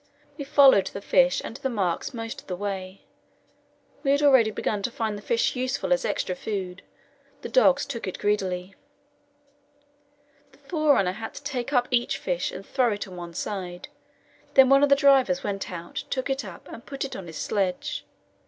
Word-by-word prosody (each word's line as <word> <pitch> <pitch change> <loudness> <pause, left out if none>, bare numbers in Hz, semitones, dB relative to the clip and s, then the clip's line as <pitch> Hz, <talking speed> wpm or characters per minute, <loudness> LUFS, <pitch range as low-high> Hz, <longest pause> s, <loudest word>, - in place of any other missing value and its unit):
We 285 - -6
followed 270 -9 +6
the - - -6
fish 270 +5 +3
and 230 - -7
the 265 - -2
marks 190 -8 -1
most 225 -2 -6
of - - -28
the 180 - -3
way. 190 -1 -5 1.0
We 275 - -1
had 285 +1 +3
already 260 -6 +6
begun 210 -1 -2
to 200 - -1
find 220 -3 -3
the 205 - -8
fish 230 +4 0
useful 255 +2 0
as 265 - 0
extra 185 - -1
food; 185 -2 -5 0.6
the - - -5
dogs 285 - +4
took 235 -7 -5
it 185 - -4
greedily. 190 -2 -1 1.8
The - - -20
forerunner 285 - +2
had 220 +4 -7
to - - -9
take 270 -2 -3
up 250 -3 +2
each 240 -1 +1
fish - - -2
and - - -8
throw 250 -4 +1
it 205 - -5
on 185 - -10
one 175 -1 -8
side; 180 -3 -5 0.7
then 265 -1 +7
one 275 0 +6
of 285 - +4
the 280 - +7
drivers 270 -10 +4
went 195 -1 -3
out, 170 -1 -6
took 260 +1 -2
it 270 0 -1
up, 190 -4 -10
and 230 - -10
put 275 -1 -5
it 270 - -7
on 185 - -7
his 160 - -8
sledge. 190 -3 -2
225 Hz, 190 wpm, -25 LUFS, 190-270 Hz, 1.8 s, then